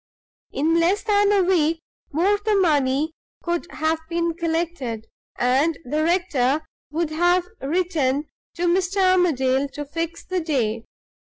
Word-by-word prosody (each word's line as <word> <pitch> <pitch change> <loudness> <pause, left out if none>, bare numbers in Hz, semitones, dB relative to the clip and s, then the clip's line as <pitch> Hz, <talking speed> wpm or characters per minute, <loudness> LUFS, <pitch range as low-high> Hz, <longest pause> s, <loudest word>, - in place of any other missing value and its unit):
In 325 +4 +1
less 365 +5 +2
than 410 -1 +3
a 400 -2 +4
week 330 -3 +2 0.3
more 380 +7 +2
the 425 -1 +2
money 300 -4 +2 0.3
could 345 0 -2
have 315 +1 -1
been 335 0 0
collected, 325 -9 -3 0.3
and 275 +6 +2
the 300 +5 -1
rector 315 -5 +1 0.2
would 315 +1 -2
have 350 +3 +2 0.2
written 300 -3 0 0.3
to 345 - -3
Mr. 365 +2 +1 0.2
Armadale 275 -6 +2
to 290 +1 -6
fix 330 +3 -5
the 370 0 -1
day. 235 -9 -1
330 Hz, 130 wpm, -23 LUFS, 285-355 Hz, 0.3 s, a